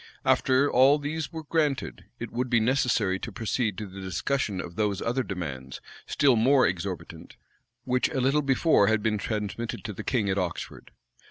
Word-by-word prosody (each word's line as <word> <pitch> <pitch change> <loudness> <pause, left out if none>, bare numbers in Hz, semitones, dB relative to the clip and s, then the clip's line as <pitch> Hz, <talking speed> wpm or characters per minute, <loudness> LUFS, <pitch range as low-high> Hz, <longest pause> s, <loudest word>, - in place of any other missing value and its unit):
After 130 +2 +3
all 135 +2 +5
these 150 +1 -4
were 160 -1 -6
granted, 150 -3 -1
it 120 - -6
would 125 +2 -2
be 120 -2 +4
necessary 115 -5 +1
to 115 - -6
proceed 110 0 -2
to 105 - -4
the 95 0 -10
discussion 95 +3 -2
of 85 -2 -7
those 105 -2 0
other 120 +3 -1
demands, 70 - -6 0.3
still 135 -4 +3
more 130 +4 +4
exorbitant, 90 0 -4 0.5
which 125 0 +1
a 135 - -2
little 135 +4 +2
before 135 -5 +3
had 110 -1 +1
been 110 -2 0
transmitted 110 +2 -4
to 105 - -5
the - - -7
king 115 -7 0
at 95 0 0
Oxford. 90 -2 -5
115 Hz, 175 wpm, -27 LUFS, 100-135 Hz, 0.5 s, all